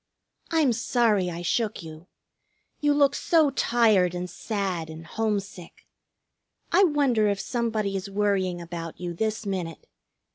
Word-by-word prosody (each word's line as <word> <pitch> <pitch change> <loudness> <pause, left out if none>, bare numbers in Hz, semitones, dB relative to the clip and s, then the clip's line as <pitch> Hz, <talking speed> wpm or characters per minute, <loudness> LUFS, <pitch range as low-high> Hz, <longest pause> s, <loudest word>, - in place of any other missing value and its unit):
"I'm 310 -7 +3
sorry 225 -5 +1
I 170 0 -6
shook 215 +2 -1
you. 160 +2 -11 0.7
You 295 -1 +2
look 285 -1 +4
so 315 -4 +3
tired 215 -9 +3
and 180 0 -3
sad 190 -5 -3
and 160 +1 -9
homesick! 200 -3 -4 0.9
I 390 - +5
wonder 275 - +2
if 200 -1 0
somebody 220 -5 -1
is 195 +1 -4
worrying 195 -3 0
about 170 -1 -7
you 175 -1 -4
this 220 +4 -2
minute. 180 -5 -4
200 Hz, 135 wpm, -26 LUFS, 175-235 Hz, 0.9 s, I